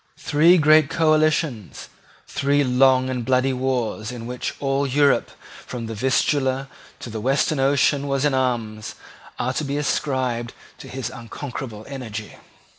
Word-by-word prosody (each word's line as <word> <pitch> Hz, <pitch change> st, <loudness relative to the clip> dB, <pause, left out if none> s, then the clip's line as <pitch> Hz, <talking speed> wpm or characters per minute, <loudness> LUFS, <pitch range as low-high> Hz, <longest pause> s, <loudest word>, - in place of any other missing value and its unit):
Three 165 Hz, +5 st, +4 dB
great 155 Hz, -2 st, +5 dB
coalitions, 155 Hz, -, 0 dB, 0.4 s
three 140 Hz, +1 st, +1 dB
long 130 Hz, 0 st, +4 dB
and 125 Hz, -2 st, -3 dB
bloody 130 Hz, +2 st, +2 dB
wars 125 Hz, -3 st, -2 dB
in 120 Hz, -2 st, -7 dB
which 125 Hz, +1 st, -4 dB
all 140 Hz, 0 st, 0 dB
Europe 140 Hz, +1 st, +2 dB, 0.4 s
from 120 Hz, -2 st, -5 dB
the 115 Hz, -, -5 dB
Vistula 130 Hz, +3 st, 0 dB, 0.3 s
to 120 Hz, -, -7 dB
the 110 Hz, -1 st, -5 dB
Western 135 Hz, +4 st, +1 dB
Ocean 140 Hz, +1 st, +2 dB
was 140 Hz, 0 st, 0 dB
in 145 Hz, -, +2 dB
arms, 115 Hz, -5 st, -2 dB, 0.4 s
are 130 Hz, +1 st, -1 dB
to 155 Hz, -, -2 dB
be 140 Hz, 0 st, -2 dB
ascribed 130 Hz, -5 st, -1 dB, 0.2 s
to -, -, -10 dB
his 130 Hz, -2 st, -5 dB
unconquerable 120 Hz, -2 st, -7 dB
energy. 110 Hz, -6 st, -7 dB
130 Hz, 140 wpm, -22 LUFS, 120-140 Hz, 0.4 s, great